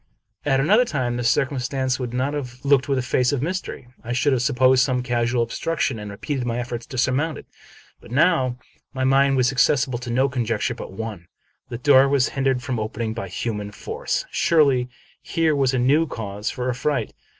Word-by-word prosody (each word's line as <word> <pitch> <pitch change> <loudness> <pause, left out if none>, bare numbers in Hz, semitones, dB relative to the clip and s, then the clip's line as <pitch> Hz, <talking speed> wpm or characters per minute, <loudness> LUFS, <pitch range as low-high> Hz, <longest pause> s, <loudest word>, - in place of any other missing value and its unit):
At 135 -2 +2
another 205 - +4
time, 130 - -2
this 120 -1 +1
circumstance 130 -1 0
would 125 -2 -4
not 130 +4 -1
have 130 -5 -5
looked 140 -2 +3
with 135 - +2
a 130 - 0
face 125 +1 +1
of 140 -2 -1
mystery, 180 -6 -4 0.2
I 120 +1 -3
should 130 +3 +2
have 125 - +1
supposed 130 -1 +4
some 125 -1 0
casual 120 -1 +1
obstruction 130 0 -2
and 105 0 -7
repeated 125 +6 -4
my 120 -1 -2
efforts 120 -1 -5
to 130 - -7
surmount 140 +5 +1
it. - - -11 0.5
But - - -15
now 130 -2 +2 0.4
my 130 - -1
mind 135 +1 +3
was 125 0 +3
accessible 130 -1 +2
to 125 0 -7
no 130 +3 +2
conjecture 120 -5 -1
but - - -8
one. 100 -3 -7 0.4
The 120 - -4
door 135 +1 +5
was 140 -2 +2
hindered 135 -2 0
from 125 -4 -2
opening 110 +1 -3
by 110 -4 -5
human 105 +2 -4
force. - - -3
Surely, 140 -6 +3 0.3
here 165 -3 +1
was 135 -2 +2
a 130 - 0
new 145 +6 +3
cause 105 -3 -4
for 125 -1 -4
affright. 125 -1 -1
130 Hz, 195 wpm, -22 LUFS, 120-140 Hz, 0.5 s, door